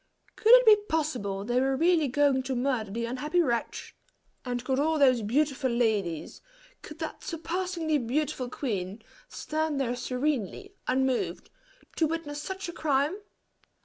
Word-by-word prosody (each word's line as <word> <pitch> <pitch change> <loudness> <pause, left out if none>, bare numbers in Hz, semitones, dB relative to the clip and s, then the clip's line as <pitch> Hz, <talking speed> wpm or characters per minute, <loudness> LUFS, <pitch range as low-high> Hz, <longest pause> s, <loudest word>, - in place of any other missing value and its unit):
Could 445 - +3
it - - +8
be 430 -1 +8
possible 245 -12 -1
they 245 +2 +1
were 270 0 +1
really 330 -1 +3
going 275 0 +2
to 260 - 0
murder 245 -4 -1
the 230 +4 -3
unhappy 295 +8 -1
wretch? 240 -8 -1 0.5
and 245 -1 -4
could 265 0 0
all 315 +2 +2
those 255 -5 +4
beautiful 270 +4 0
ladies 215 -9 -1 0.4
could 305 - -10
that 320 -1 -6
surpassingly 335 -1 -2
beautiful 260 +1 -2
queen, 210 -5 -4 0.3
stand 310 -2 -2
there 250 -2 0
serenely 265 - -2
unmoved, 260 0 0 0.5
to 320 - +3
witness 300 -2 -4
such 380 +3 -5
a 345 - -6
crime? 290 +2 +1
275 Hz, 145 wpm, -28 LUFS, 245-315 Hz, 0.5 s, it